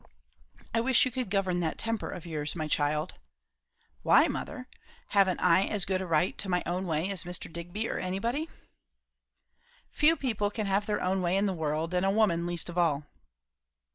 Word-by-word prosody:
"I 230 - +2
wish 260 +1 +4
you 255 - -2
could 250 -3 -3
govern 190 -3 +1
that 165 -2 -1
temper 225 -1 -2
of 175 - -7
yours, 150 -2 -3
my 155 -2 -2
child." 150 +2 0 0.9
"Why, - - +5
mother? - - -5 0.4
Haven't 195 -3 +3
I 180 +2 +4
as 205 -4 -1
good 190 0 0
a 190 - -4
right 165 +2 +2
to 195 - -1
my 180 -1 +1
own 180 +2 -2
way 165 +4 0
as 190 -2 -1
Mr. 175 -2 -4
Digby, 175 +6 -4
or - - -3
anybody?" 230 - -2 1.4
"Few 310 +2 +4
people 220 -8 -1
can 215 0 -3
have 200 +1 0
their 210 - -1
own 185 +1 +1
way 180 +1 +1
in 200 - +2
the 195 - 0
world; 160 +1 -2
and 180 0 +1
a 195 - +3
woman 195 -5 +2
least 175 -1 -2
of 175 0 -3
all." 155 -4 +1
185 Hz, 190 wpm, -29 LUFS, 170-205 Hz, 1.4 s, Why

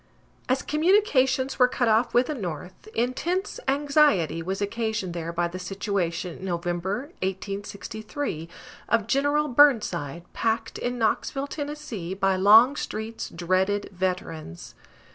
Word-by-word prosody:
As 255 +1 +1
communications 300 -7 +2
were 250 - +7
cut 250 -1 0
off 225 +2 +3
with 245 +1 +4
the 305 - -3
North, 180 - -6
intense 335 - -1
anxiety 280 - +3
was 190 +3 -3
occasioned 215 -3 -2
there 170 -1 -4
by 170 0 0
the 180 +2 -7
situation 180 -2 -2
in 190 - -7
November, 180 - -2
1863, 200 - -4 0.4
of 230 -2 +2
General 285 +4 +2
Burnside, 230 - +3
packed 225 0 -1
in 245 0 -2
Knoxville, 240 +4 0
Tennessee, 285 - -5
by 195 -1 +2
Longstreet's 220 +2 +3
dreaded 185 +4 0
veterans. 180 - -4
215 Hz, 120 wpm, -26 LUFS, 185-265 Hz, 0.4 s, were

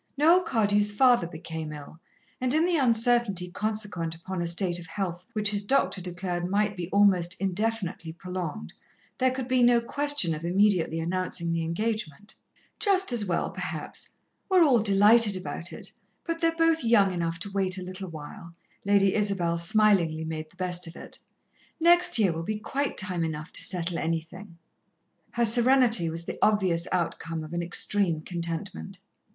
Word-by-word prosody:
Noel 330 +5 +5
Cardew's 205 - +1
father 240 -4 +3
became 160 -2 -7
ill, 150 +1 -11 0.4
and 255 +2 +2
in 320 +2 +3
the 355 -1 +1
uncertainty 230 - +2
consequent 205 -6 -3
upon 180 +2 -6
a 170 - -1
state 175 0 +1
of 170 - -9
health 180 0 -5
which 210 -1 +2
his 205 -1 0
doctor 205 -3 +1
declared 180 0 -4
might 205 +1 0
be 175 -2 -6
almost 185 -4 +3
indefinitely 195 -3 -2
prolonged, 175 - -6 0.5
there 260 - +3
could 260 -1 -4
be 255 -1 +2
no 240 -1 +5
question 285 - +1
of 155 +1 -6
immediately 180 -2 +1
announcing 170 0 -2
the 165 0 -1
engagement. 205 0 -4 0.5
"Just 385 - +2
as 225 -4 +1
well, 175 -3 -1
perhaps. - - -6 0.4
We're 370 -2 +5
all 265 -7 +4
delighted 210 +1 +4
about 175 -2 -5
it, - - -10 0.3
but 330 0 -4
they're 330 0 +2
both 330 -2 +2
young 205 -5 +3
enough 165 -1 -2
to 200 0 -4
wait 190 -1 -1
a 185 - -6
little 185 +1 -7
while," 165 +2 -10 0.3
Lady 200 -1 +3
Isabel 195 -5 0
smilingly 170 -4 +2
made 155 -1 -6
the - - -25
best 180 -1 -2
of 165 - -10
it. - - -10 0.6
"Next 345 -2 +5
year 200 -6 +3
will 165 - -4
be 210 +6 -3
quite 275 +6 -3
time 185 -4 +1
enough 155 0 -5
to - - 0
settle 175 -1 -1
anything." 165 +3 -5 0.8
Her 235 0 +1
serenity 235 -5 +4
was 165 +1 -6
the - - -6
obvious 185 -5 +2
outcome 165 -2 -2
of 155 +2 -9
an 170 - -1
extreme 175 -1 0
contentment. 165 - -5
190 Hz, 165 wpm, -26 LUFS, 170-225 Hz, 0.8 s, Noel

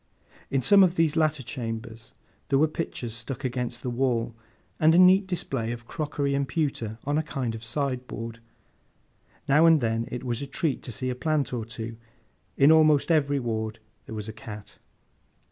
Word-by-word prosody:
In 135 -2 0
some 200 - +7
of 180 -1 +2
these 160 -2 +2
latter 155 -4 +1
chambers, 115 -2 -6 0.3
there 135 - +3
were 155 +3 +4
pictures 140 -7 -4
stuck 120 +4 -6
against 125 -1 -3
the 125 - -2
wall, 120 -2 0 0.5
and 160 +1 +5
a - - +5
neat 185 +2 +6
display 120 -10 -2
of 120 0 -7
crockery 145 0 -2
and 140 0 0
pewter 125 -7 -2
on 145 +2 0
a - - +2
kind 135 -6 -3
of 110 0 -8
sideboard; 125 -3 -3 1.1
now 150 +4 +5
and 165 -2 +6
then 115 -1 -1
it 125 - -5
was 120 -1 -2
a 140 - -4
treat 140 +1 -1
to 125 - -7
see 130 +3 -3
a - - -4
plant 150 -1 -1
or 115 -3 -3
two; 115 0 -7 0.6
in 140 +2 +6
almost 155 -1 +5
every 145 -3 +2
ward 110 -2 -3 0.3
there 110 - -6
was 105 0 -5
a 110 - -6
cat. 105 -1 -10
130 Hz, 180 wpm, -26 LUFS, 115-150 Hz, 1.1 s, some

